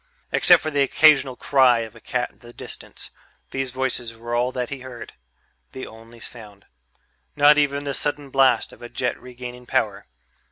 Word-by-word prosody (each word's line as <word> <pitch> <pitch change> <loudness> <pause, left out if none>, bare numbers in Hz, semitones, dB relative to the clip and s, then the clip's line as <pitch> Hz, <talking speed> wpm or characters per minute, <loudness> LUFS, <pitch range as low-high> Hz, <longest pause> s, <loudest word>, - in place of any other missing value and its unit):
Except 175 -3 +5
for 155 - -2
the 145 -1 +1
occasional 140 -2 +4
cry 125 -3 +4
of 110 0 -8
a - - -13
cat 125 +2 -2
in - - -30
the 120 -1 -13
distance, - - -9 0.4
these 135 -1 -2
voices 125 -3 -2
were 120 +1 -6
all 120 +1 +1
that 125 -2 -3
he 140 - -6
heard... 125 -3 -10 0.6
the 130 - -6
only 115 +1 -14
sound. 105 -4 -10 0.7
Not 150 0 +6
even 140 -1 +1
the 140 -1 -3
sudden 145 -1 -3
blast 130 -4 +3
of - - -17
a 120 - -8
jet 120 0 -1
regaining 125 0 -9
power - - -1
125 Hz, 175 wpm, -23 LUFS, 120-140 Hz, 0.7 s, Not